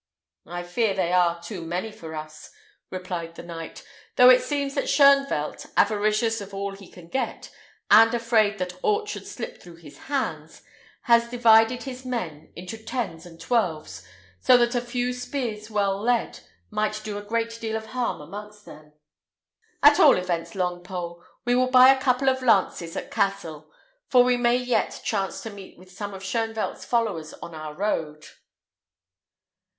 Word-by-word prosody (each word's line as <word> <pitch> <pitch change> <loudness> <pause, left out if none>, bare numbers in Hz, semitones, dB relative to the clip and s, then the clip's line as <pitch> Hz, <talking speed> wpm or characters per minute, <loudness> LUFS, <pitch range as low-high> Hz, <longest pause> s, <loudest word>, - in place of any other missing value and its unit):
"I 175 0 -5
fear 195 +4 0
they 180 -2 0
are 175 -1 +3
too 180 +1 -6
many 175 +6 -4
for 160 -6 -9
us," 155 0 -9 0.4
replied 180 -3 -5
the - - -9
knight, 165 -1 -8 0.3
"though 250 0 +8
it 255 0 +6
seems 280 +2 -2
that 275 - -2
Shoenvelt, 275 - +3
avaricious 215 +2 +2
of 200 0 -9
all 200 0 -3
he 195 -1 -13
can 175 -2 -14
get, 265 +9 -4 0.4
and 225 +2 +8
afraid 225 -3 +2
that 180 -1 -5
aught 425 0 +1
should - - -6
slip - - -7
through 175 -1 -13
his 165 -4 -15
hands, 280 -2 -3 0.4
has 235 -1 +4
divided 235 0 +4
his 260 -1 -7
men 175 - -5
into 185 +6 -8
tens 210 -9 -4
and 165 -1 -15
twelves, 160 - -1 0.4
so 250 - +6
that 240 0 +2
a 245 - 0
few 245 +1 -2
spears 245 -4 -4
well 200 -2 0
led 240 +1 0 0.3
might 215 0 -1
do 210 -1 -4
a - - -10
great 230 +2 -2
deal 220 -1 -3
of 220 0 -4
harm 250 -9 -2
amongst 210 +6 -10
them. 150 0 -14 0.9
At 290 0 +7
all - - +7
events, 170 -2 -3
Longpole, 175 -1 -4 0.2
we 245 - +2
will 255 +1 +2
buy 255 0 +8
a 265 - -5
couple 260 0 +1
of 260 0 +2
lances 190 -8 +1
at - - -6
Cassel; 160 -6 -2 0.4
for 250 -2 +6
we 250 0 +3
may 240 0 +2
yet 250 -1 -1
chance 195 -3 -2
to 225 - -6
meet 200 -2 -12
with 185 +1 -17
some 200 +1 -6
of 190 - -10
Shoenvelt's 225 +2 -3
followers 200 -10 -1
on 170 - -10
our 155 -1 -7
road." 155 -6 -2
210 Hz, 165 wpm, -25 LUFS, 175-245 Hz, 0.9 s, though